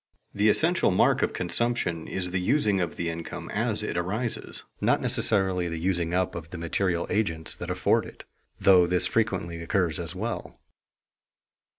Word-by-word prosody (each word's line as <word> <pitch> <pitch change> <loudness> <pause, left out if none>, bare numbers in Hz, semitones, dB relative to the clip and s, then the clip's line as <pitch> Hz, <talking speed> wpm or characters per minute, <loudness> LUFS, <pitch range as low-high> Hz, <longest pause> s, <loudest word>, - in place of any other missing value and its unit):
The 105 +2 +3
essential 165 - +3
mark 95 - +3
of - - +1
consumption 120 -9 0
is 90 -2 -3
the 95 0 -1
using 105 -3 +2
of 85 -3 -2
the 85 - -3
income 85 0 -7
as - - 0
it - - -3
arises, 105 +7 -3 0.2
not - - +3
necessarily 95 -3 +1
the 85 - -4
using 85 -1 0
up 90 0 0
of 85 -1 -7
the 90 - -7
material 85 +1 0
agents 85 -7 0
that - - -6
afford - - +1
it, - - -12 0.4
though 90 -3 +6
this 90 0 +2
frequently 95 -7 -1
occurs 85 -2 0
as 85 +1 -4
well. 115 +5 -4
90 Hz, 165 wpm, -27 LUFS, 85-100 Hz, 0.4 s, though